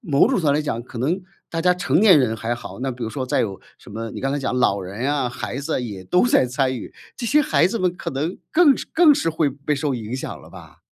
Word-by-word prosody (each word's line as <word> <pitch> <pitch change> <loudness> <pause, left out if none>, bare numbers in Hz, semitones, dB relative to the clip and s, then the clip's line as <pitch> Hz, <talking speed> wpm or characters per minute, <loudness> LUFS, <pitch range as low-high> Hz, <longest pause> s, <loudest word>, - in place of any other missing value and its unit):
某 145 -4 +1
种 - - +5
程 265 - +1
度 160 - -1
上 145 - +4
来 150 - +2
讲， 120 -6 -3
可 120 0 -10
能 165 +10 -1 0.3
大 165 -1 -3
家 180 - +5
成 175 -1 +1
年 195 -7 +7
人 115 -5 +1
还 115 +2 -2
好， 120 - -9
那 135 +1 -1
比 125 -1 -5
如 - - -3
说 130 +2 -3
再 130 - 0
有 100 -4 -3 0.2
什 - - -15
么 115 +1 -5
你 - - -7
刚 135 0 -1
才 145 - -1
讲 130 -2 -2
老 100 -5 +2
人 100 +8 -4
啊、 145 -3 0
孩 120 -1 -5
子 140 -1 -2
也 100 -6 -6
都 180 - +3
在 245 - +4
参 130 +1 0
与， 115 - -8 0.2
这 245 - -6
些 295 +6 +4
孩 300 - +3
子 230 - -2
们 180 -2 0
可 - - -5
能 150 +6 -3
更 315 -5 +5
是 - - -5
更 320 -3 +6
是 165 - 0
会 160 -2 +1
被 140 +2 -3
受 140 -1 -1
影 115 0 -5
响 130 - -6
了 - - -15
吧。 - - -14
140 Hz, 310 characters per minute, -22 LUFS, 120-175 Hz, 0.3 s, 年